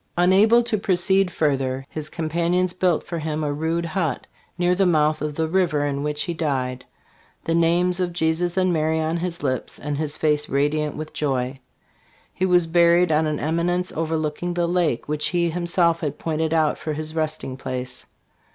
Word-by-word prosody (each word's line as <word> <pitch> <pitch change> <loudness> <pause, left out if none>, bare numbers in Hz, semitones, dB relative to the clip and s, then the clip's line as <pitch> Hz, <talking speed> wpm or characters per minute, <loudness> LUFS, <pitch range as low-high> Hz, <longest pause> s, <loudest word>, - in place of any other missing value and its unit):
Unable 200 +7 +5
to 230 -3 -1
proceed 190 0 +2
further, 135 -5 -1
his 155 0 -7
companions 170 +3 0
built 180 -3 +1
for 170 -1 -5
him 155 0 -3
a 145 -1 -1
rude 165 +3 -1
hut, 165 -4 -2 0.3
near 175 0 +2
the 190 +1 +2
mouth 155 -2 +2
of 150 -1 -3
the 160 +1 0
river, 165 -4 +1
in 140 -1 -2
which 150 0 -1
he 170 - -3
died, 130 -6 -2 0.6
with - - -38
the 165 - 0
names 175 +2 +2
of 180 -1 0
Jesus 170 +1 0
and 185 -1 +2
Mary 160 0 +1
on 160 +1 -1
his 175 0 -4
lips 130 -2 -2
and 145 -1 -4
his 155 -1 -1
face 150 -1 +1
radiant 150 +2 0
with 155 0 -7
joy. 130 -2 -2 0.7
He 185 - 0
was 180 -2 +4
buried 170 +1 +4
on 155 +1 +2
an 150 -1 -2
eminence 175 +3 0
overlooking 160 +2 -2
the 175 -1 +1
lake, 170 -8 0
which 150 0 0
he 170 -2 0
himself 170 0 +1
had 150 -3 -3
pointed 160 0 -2
out 160 -2 +1
for 155 -1 -3
his 155 +1 -5
resting 155 -4 -2
place. 130 -1 -6
160 Hz, 185 wpm, -23 LUFS, 150-175 Hz, 0.7 s, Unable